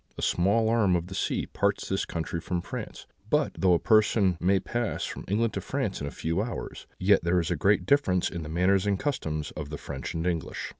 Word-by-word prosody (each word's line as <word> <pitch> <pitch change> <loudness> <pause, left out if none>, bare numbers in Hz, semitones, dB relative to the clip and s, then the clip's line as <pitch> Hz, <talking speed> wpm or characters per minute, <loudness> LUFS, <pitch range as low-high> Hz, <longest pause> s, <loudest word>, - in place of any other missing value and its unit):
A - - -5
small 100 +6 +2
arm 110 -5 +3
of 85 -1 -1
the 95 - -9
sea 95 - -1
parts 100 0 -1
this 95 - -1
country 85 0 -4
from 90 0 -3
France; - - -7 0.2
but - - +2
though 90 -2 +4
a - - +4
person 105 -4 +3
may 95 +2 +3
pass 120 +3 -2
from - - -7
England 110 +3 +1
to - - -3
France - - -2
in 70 - -3
a - - -2
few 85 +6 -2
hours, 115 +2 -6
yet 95 0 +3
there 85 +1 +2
is 85 0 -2
a - - +2
great 95 +7 +2
difference 95 -11 +3
in 85 - -5
the 75 - -7
manners 90 +4 +2
and 100 -1 +2
customs 80 - -2
of 75 -2 -6
the 75 - -5
French - - -6
and 80 +1 -2
English. 85 -4 -2
95 Hz, 230 wpm, -27 LUFS, 85-105 Hz, 0.2 s, though